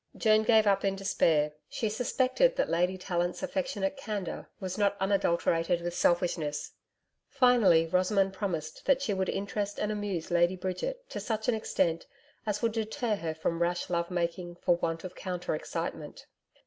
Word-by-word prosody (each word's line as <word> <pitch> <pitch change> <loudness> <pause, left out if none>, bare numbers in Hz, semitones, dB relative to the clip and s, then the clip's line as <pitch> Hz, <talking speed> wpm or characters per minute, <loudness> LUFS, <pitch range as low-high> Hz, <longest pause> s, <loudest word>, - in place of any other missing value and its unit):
Joan 215 -1 +4
gave 220 0 +4
up 195 -1 +3
in 195 -1 +1
despair. 160 -6 +2 0.2
She 225 - -2
suspected 255 - +2
that - - 0
Lady 180 +2 +1
Tallant's 175 +3 -2
affectionate 265 -6 -2
candour 210 -9 -5
was 185 -1 -4
not 200 -1 +1
unadulterated 175 -3 +1
with 175 0 -3
selfishness. 170 -4 0 0.6
Finally, 245 - +5
Rosamond 190 +3 +2
promised 165 -6 -4
that 275 -2 +5
she 215 - 0
would 190 -1 -1
interest 205 +1 -2
and 210 - 0
amuse 205 -6 -3
Lady 175 +1 +3
Bridget 345 - -4
to - - -4
such 220 0 -3
an - - +3
extent 175 -6 0 0.4
as 210 +1 -1
would 230 - +3
deter 220 0 -1
her 160 -4 -4
from 165 +1 -2
rash 175 +1 0
love 170 0 0
making 175 0 -2
for 175 0 +2
want 165 -1 -2
of 185 -1 -6
counter 180 -3 -3
excitement. 155 - -5
190 Hz, 160 wpm, -30 LUFS, 175-215 Hz, 0.6 s, Finally